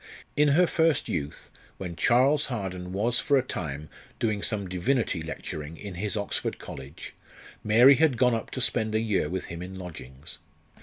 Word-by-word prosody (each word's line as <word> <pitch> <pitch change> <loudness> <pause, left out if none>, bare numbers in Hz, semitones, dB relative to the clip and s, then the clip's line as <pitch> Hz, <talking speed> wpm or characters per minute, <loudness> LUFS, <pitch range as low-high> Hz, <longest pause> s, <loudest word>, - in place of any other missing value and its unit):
In 150 0 +4
her 180 - +6
first 165 -2 +2
youth, 70 +1 -4 0.3
when 90 -3 -6
Charles 130 - +3
Harden 95 -7 -4
was 115 +6 +1
for 140 - +3
a 130 - +2
time 75 - -5 0.3
doing 105 -3 -1
some 100 -3 +1
divinity 95 +1 0
lecturing 80 0 -6
in 100 -2 -7
his 105 +5 -2
Oxford 100 - -2
college, 70 +2 -9 0.5
Mary 120 +6 +7
had 155 -6 +3
gone 125 0 +4
up 115 - -3
to 130 - -4
spend 110 -3 +1
a - - +3
year 105 -9 0
with 95 0 -3
him 85 0 -7
in 95 +1 -7
lodgings. 75 -8 -9
105 Hz, 170 wpm, -27 LUFS, 90-125 Hz, 0.5 s, Mary